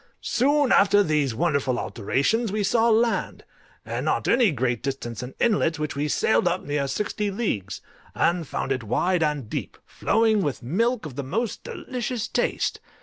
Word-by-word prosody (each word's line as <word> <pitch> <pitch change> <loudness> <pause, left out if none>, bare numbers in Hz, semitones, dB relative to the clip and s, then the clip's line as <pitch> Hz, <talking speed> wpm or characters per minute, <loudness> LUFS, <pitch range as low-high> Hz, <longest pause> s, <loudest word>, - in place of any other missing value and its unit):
Soon 285 +2 +2
after 205 +1 +5
these 150 - 0
wonderful 140 -3 +1
alterations 140 - 0
we 210 0 -1
saw 225 +3 +3
land, 230 +1 +1 0.4
and - - -3
not - - 0
at - - +4
any 235 -3 +4
great 120 - -1
distance 130 -5 -4
an 125 +1 -8
inlet, 200 -8 +2
which 150 -1 -3
we 145 +2 -1
sailed 180 +4 +2
up 175 +2 0
near 145 -1 -1
sixty 210 +6 -2
leagues, 150 - -3 0.3
and 170 -2 +1
found 130 - -3
it 130 -3 -1
wide 175 - +1
and 150 -6 0
deep, - - -5
flowing 220 -2 +2
with 145 -7 -2
milk 225 - 0
of 140 -4 -8
the 140 - -2
most 215 - -3
delicious 245 -2 -4
taste. - - -1
170 Hz, 170 wpm, -24 LUFS, 135-225 Hz, 0.4 s, after